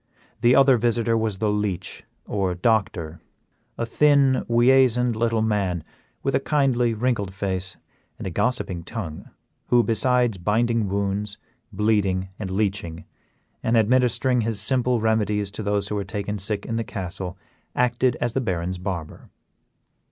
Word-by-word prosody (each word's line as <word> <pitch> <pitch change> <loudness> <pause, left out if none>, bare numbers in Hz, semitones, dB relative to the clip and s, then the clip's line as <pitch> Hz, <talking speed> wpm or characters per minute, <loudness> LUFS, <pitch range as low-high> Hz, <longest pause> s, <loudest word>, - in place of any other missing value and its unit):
The 120 +2 +4
other 135 -2 +6
visitor 115 0 +1
was 110 -3 0
the 105 +1 0
leech 105 -3 -3 0.2
or 95 -3 -1
doctor, 90 -5 0 0.6
a 115 - -1
thin, 140 +1 +3
weasand 125 0 +4
little 115 0 +1
man, 100 -6 0 0.4
with 135 - 0
a - - +3
kindly, 130 -5 +1
wrinkled 110 -4 -1
face 95 -1 -4 0.4
and - - -7
a 95 - -3
gossiping 95 -4 -1
tongue, 90 -10 -6 0.4
who, 120 -1 +4
besides 120 -2 +1
binding 115 +3 +1
wounds, 100 +1 -2 0.3
bleeding, 100 -3 +1
and 100 -3 -4
leeching, 95 -4 -2 0.6
and 115 +1 +2
administering 125 +2 +2
his 110 -2 -2
simple 125 +2 +1
remedies 105 -2 0
to 110 - -6
those 100 -1 -1
who - - -3
were 100 -1 -1
taken 100 +1 -4
sick 100 +1 -2
in 115 - -2
the 115 - -1
castle, 95 -5 -5 0.4
acted 125 0 +2
as 120 -2 -1
the 135 - 0
Baron's 90 -4 -2
barber. 90 -4 -6
110 Hz, 145 wpm, -24 LUFS, 100-120 Hz, 0.6 s, other